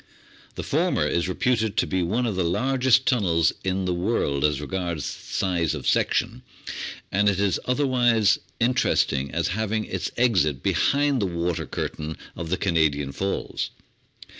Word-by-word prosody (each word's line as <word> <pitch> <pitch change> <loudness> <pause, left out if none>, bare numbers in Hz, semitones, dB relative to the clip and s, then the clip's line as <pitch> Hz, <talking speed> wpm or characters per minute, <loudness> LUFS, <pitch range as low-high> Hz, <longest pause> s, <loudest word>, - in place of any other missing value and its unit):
The - - -5
former - - +1
is 85 +1 0
reputed 110 +1 0
to - - +3
be 95 -1 -1
one 110 +9 0
of 110 -5 -1
the 95 - +1
largest 130 +8 +2
tunnels 85 - +2
in 95 0 -1
the 90 - 0
world 85 -7 0
as 75 -2 +2
regards 85 0 -3
size 85 -5 -1
of - - -5
section, - - +1 0.7
and 100 +2 +3
it 95 -1 -1
is 100 -2 +1
otherwise 125 -5 +3 0.2
interesting 115 - +1
as 85 +4 -1
having 110 +2 -1
its - - -3
exit 90 - +2
behind 140 -3 +2
the 100 - +1
water 85 -1 -2
curtain 80 +1 -4 0.2
of 85 -1 -5
the 95 - 0
Canadian 75 -6 +1
Falls. 95 +7 -3
95 Hz, 150 wpm, -24 LUFS, 85-115 Hz, 0.7 s, to